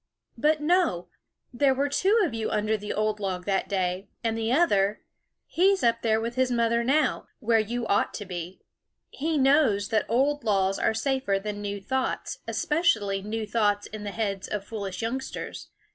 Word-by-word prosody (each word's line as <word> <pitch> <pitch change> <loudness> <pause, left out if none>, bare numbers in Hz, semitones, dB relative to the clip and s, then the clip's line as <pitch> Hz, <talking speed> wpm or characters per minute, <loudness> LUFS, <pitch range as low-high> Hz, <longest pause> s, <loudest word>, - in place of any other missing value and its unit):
" - - -46
But 305 -1 +3
no! 320 - +1 0.4
there 270 +1 +3
were 280 +2 +1
two 385 +10 +2
of 295 - -3
you 225 -1 -2
under 215 +1 0
the 210 0 -5
old 215 0 0
log 185 -3 -3
that 195 -1 0
day; 185 0 -1 0.2
and 225 -1 0
the 225 0 -1
other, 210 - +2 0.4
he 385 +4 +3
's 380 - -7
up 230 -1 +2
there 220 -1 +2
with 230 +1 -3
his 260 0 +1
mother 235 0 +2
now, 285 +5 +1
where 230 -2 +3
you 235 +2 -2
ought 200 - +1
to 205 - -5
be, 180 0 -7 0.5
he 310 +3 -1
knows 265 -8 +3
that 220 -2 +1
old 275 +4 +1
laws 195 -3 +1
are 220 - +1
safer 265 -4 0
than 205 +1 -5
new 205 0 -3
thoughts, 260 +6 -2
especially 220 - +1
new 215 +2 -3
thoughts 205 -2 +1
in 215 -1 -8
the 205 - -3
heads 200 -2 -3
of 205 -2 -4
foolish 200 -3 -5
youngsters. 260 +4 -5
225 Hz, 185 wpm, -26 LUFS, 205-265 Hz, 0.5 s, But